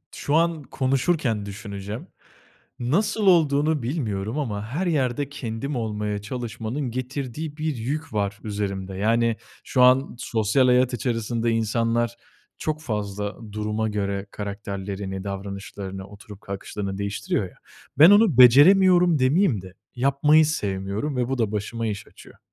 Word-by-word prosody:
şu 145 - -1
an 165 -1 +2
konuşurken 130 -3 0
düşüneceğim. 100 +1 -7 0.7
Nasıl 195 - +1
olduğunu 155 -4 +3
bilmiyorum 115 -3 -2
ama 105 -7 -3
her 155 +11 -2
yerde 140 -3 0
kendim 135 0 -4
olmaya 105 -3 -2
çalışmanın 120 +3 -4
getirdiği 135 +4 -5
bir 155 -1 -2
yük 145 +5 -4
var 100 -1 -1
üzerimde. 100 -3 -4
Yani, 115 +3 +2 0.3
şu 130 - +1
an 130 +2 +5
sosyal 110 +3 +1
hayat 125 0 +3
içerisinde 115 -1 -1
insanlar 115 +1 0 0.4
çok 155 0 -3
fazla 105 -5 -3 0.2
duruma 105 +1 -2
göre 100 -1 -2
karakterlerini, 100 -1 -5
davranışlarını, 100 -1 -6
oturup 105 0 -13
kalkışlarını 100 0 -5
değiştiriyor 100 0 -2
ya. - - -22 0.4
Ben 165 +6 +10
onu 205 - +5
beceremiyorum, 175 +6 +7
demeyeyim 130 - +2
de 95 0 -12 0.2
yapmayı 140 +5 +4
sevmiyorum 105 -1 -2
ve 125 -1 -1
bu 135 - -1
da 110 -4 0
başıma 115 +2 -3
iş 105 -1 -5
açıyor. - - -16
115 Hz, 130 wpm, -24 LUFS, 105-140 Hz, 0.7 s, Ben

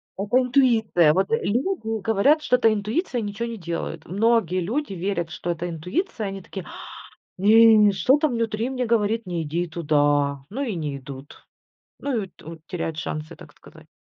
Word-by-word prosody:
Это 205 +5 0
интуиция, 235 - +3
вот 190 +2 +1
люди 225 - -1
говорят, 225 +10 +3
что 275 - +2
это 225 -3 +3
интуиция 230 - -2
и - - -3
ничего 210 +3 -4
не 230 - -6
делают. 170 -3 -5
Многие 205 -1 +1
люди 230 - -2
верят, 175 -2 -2
что 175 +2 -4
это 170 +1 -4
интуиция, 210 - -3
они 195 0 -6
такие: 190 0 -8
"А! - - -10 0.5
Не, 215 +1 +6
что 200 +9 +3
там 300 -1 +1
внутри 230 0 -1
мне 255 -2 -2
говорит, 225 -1 +1
не 170 -2 -2
иди 170 +4 -2
туда." 145 -3 +1
Ну, 255 +7 -5
и 230 -8 -3
не 150 -4 -3
идут. 135 +1 -11 0.5
Ну 260 -6 -2
и 195 - -7
ту 165 -2 -12
теряют 165 -3 -4
шансы, 155 -1 -5
так - - -15
сказать. - - -17
205 Hz, 175 wpm, -23 LUFS, 170-230 Hz, 0.5 s, Не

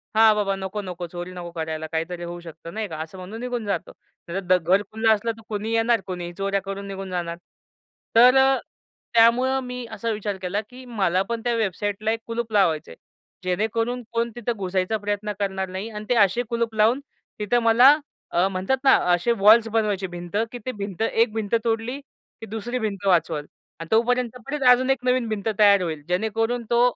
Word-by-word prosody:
हां, 220 0 +7
बाबा, 200 -2 0
नको, 195 +2 -4
नको, 180 -2 -6
चोरी 175 +1 -7
नको 175 -1 -7
करायला, 160 -1 -4
काहीतरी 170 +2 -3
होऊ 175 0 -6
शकतं, 165 0 -10
नाही 215 -1 -3
का, 160 - -7
असं 165 +4 -8
म्हणून 195 +5 -8
निघून 245 -3 -3
जातो. 200 - -2 0.4
नाही, 185 +1 +1
घर 185 +5 +3
खुलं 220 +1 +1
असलं 230 +2 -1
तर - - -13
कुणी 215 +1 -3
येणार, 225 -1 +2
कोणीही 175 -2 -5
चोऱ्या 195 0 0
करून 195 0 -6
निघून 195 -1 -6
जाणार. 170 -2 -3 0.8
तर 250 +3 +8
अ, 265 0 +5 0.6
त्यामुळं 245 +3 +4
मी 250 -1 -6
असा 230 - -3
विचार 210 -2 -3
केला, 190 +3 -1
की 255 +1 -12
मला 195 -7 +1
पण 230 -1 -2
त्या 240 -1 +1
वेबसाईटला 205 0 -1
एक 225 - -1
कुलूप 230 -1 -3
लावायचंय. 160 - +1 0.5
जेणेकरून 225 +6 -1
कोण 235 0 0
तिथं 240 0 -2
घुसायचा 190 +2 -1
प्रयत्न 205 0 -3
करणार 190 -1 -2
नाही. 190 +4 -5
आणि 210 -1 -7
ते 245 - +3
असे 205 +2 +3
कुलूप 235 -1 -1
लावून 220 +5 +4 0.4
तिथं 210 +4 +2
मला 245 +6 +7 0.4
अ, 175 +2 +4
म्हणतात 190 +7 0
ना, 270 - +6 0.2
असे 175 +7 +2
वॉल्स 220 +3 +7
बनवायचे, 210 -4 0
भिंत. 175 +1 -8 0.2
की 245 - -6
ते 255 - -1
भिंत, 200 0 -5
एक 225 0 +2
भिंत 220 -2 -3
तोडली 230 +3 -1
की 225 - -16
दुसरी 225 +4 -4
भिंत 205 -3 -3
वाचवल 165 -5 +2 0.3
आणि 165 - -7
तोपर्यंत 245 +2 +2
परत 290 0 -3
अजून 255 +1 +5
एक 265 -2 +1
नवीन 250 -1 +2
भिंत 215 -1 -3
तयार 200 -2 +6
होईल, 160 -4 -3
जेणेकरून 225 +6 0
तो 235 0 +4
210 Hz, 190 wpm, -24 LUFS, 185-230 Hz, 0.8 s, तर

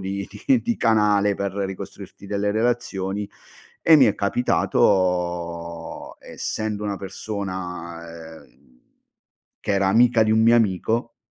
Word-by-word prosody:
di 100 +1 -4 0.2
di 265 -4 +4
di 235 -1 -1
canale 105 -2 +3
per 100 -1 -3
ricostruirti 100 0 -6
delle 100 0 -1
relazioni 105 -4 -1 0.6
e 160 -1 +8
mi 135 - +7
è 105 -4 +3
capitato, 90 -6 0
essendo 105 -1 -4
una 100 -1 -2
persona 90 -5 -7
ehm, - - -27 0.8
che - - -2
era 100 -1 +2
amica 115 +2 +4
di 110 - +1
un 110 - +3
mio 115 +1 +5
amico 115 +2 0
100 Hz, 120 wpm, -23 LUFS, 90-110 Hz, 0.8 s, e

